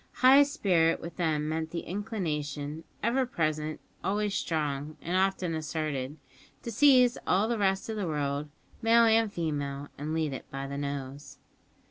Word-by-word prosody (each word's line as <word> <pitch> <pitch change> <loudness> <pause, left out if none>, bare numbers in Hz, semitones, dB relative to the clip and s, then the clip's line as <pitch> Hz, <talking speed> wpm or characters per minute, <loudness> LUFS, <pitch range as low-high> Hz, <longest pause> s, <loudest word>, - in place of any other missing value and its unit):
High 265 +2 +7
spirit 190 - +2
with 170 0 -8
them 155 -4 0
meant 160 0 -2
the 170 +1 -4
inclination 155 -7 -4 0.2
ever 250 +3 +2
present, 155 -6 -1 0.2
always 205 +1 0
strong, 150 -3 -2
and 175 +2 -3
often 190 -2 +1
asserted 155 -3 -3 0.5
to 235 - -4
seize 250 0 +5
all 200 +4 +3
the 230 -1 -1
rest 195 -1 +1
of 220 -1 -4
the 200 -4 -2
world, 145 -1 -2 0.3
male 230 +1 +5
and 225 -1 +4
female, 145 -5 -3
and 150 +2 -3
lead 155 -3 0
it 130 - -8
by 135 0 -5
the 140 +1 -5
nose! 140 0 -5
160 Hz, 155 wpm, -29 LUFS, 150-205 Hz, 0.5 s, High